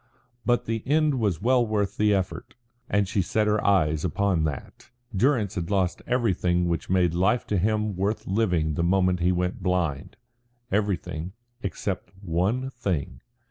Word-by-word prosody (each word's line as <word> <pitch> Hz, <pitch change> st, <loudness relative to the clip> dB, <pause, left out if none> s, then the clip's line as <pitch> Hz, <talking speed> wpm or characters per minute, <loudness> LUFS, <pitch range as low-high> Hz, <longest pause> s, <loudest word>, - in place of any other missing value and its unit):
But 120 Hz, 0 st, +2 dB
the 115 Hz, 0 st, -2 dB
end 150 Hz, -2 st, +2 dB
was 100 Hz, -6 st, 0 dB
well 125 Hz, 0 st, +4 dB
worth 105 Hz, -3 st, -1 dB
the 105 Hz, 0 st, +3 dB
effort, 95 Hz, -2 st, -2 dB, 0.3 s
and 105 Hz, -1 st, +2 dB
she 100 Hz, 0 st, +1 dB
set 105 Hz, +4 st, 0 dB
her 105 Hz, 0 st, +1 dB
eyes 80 Hz, -6 st, +2 dB
upon 90 Hz, -1 st, +1 dB
that. 70 Hz, -3 st, -6 dB, 0.3 s
Durrance 115 Hz, -2 st, +2 dB
had 85 Hz, -2 st, -3 dB
lost 95 Hz, -3 st, 0 dB
everything 90 Hz, -8 st, +1 dB
which 85 Hz, -1 st, -2 dB
made 90 Hz, -3 st, +2 dB
life 95 Hz, +7 st, +2 dB
to 100 Hz, -, 0 dB
him 105 Hz, +1 st, 0 dB
worth 100 Hz, +4 st, -1 dB
living 90 Hz, -7 st, +1 dB
the 85 Hz, -, -1 dB
moment 90 Hz, 0 st, +2 dB
he 90 Hz, +1 st, +2 dB
went 90 Hz, +1 st, -1 dB
blind 90 Hz, -6 st, -1 dB, 0.6 s
everything, 95 Hz, -4 st, -1 dB, 0.3 s
except 95 Hz, -2 st, -4 dB
one 100 Hz, +9 st, -1 dB
thing. 95 Hz, -, -3 dB
95 Hz, 155 wpm, -26 LUFS, 90-110 Hz, 0.6 s, well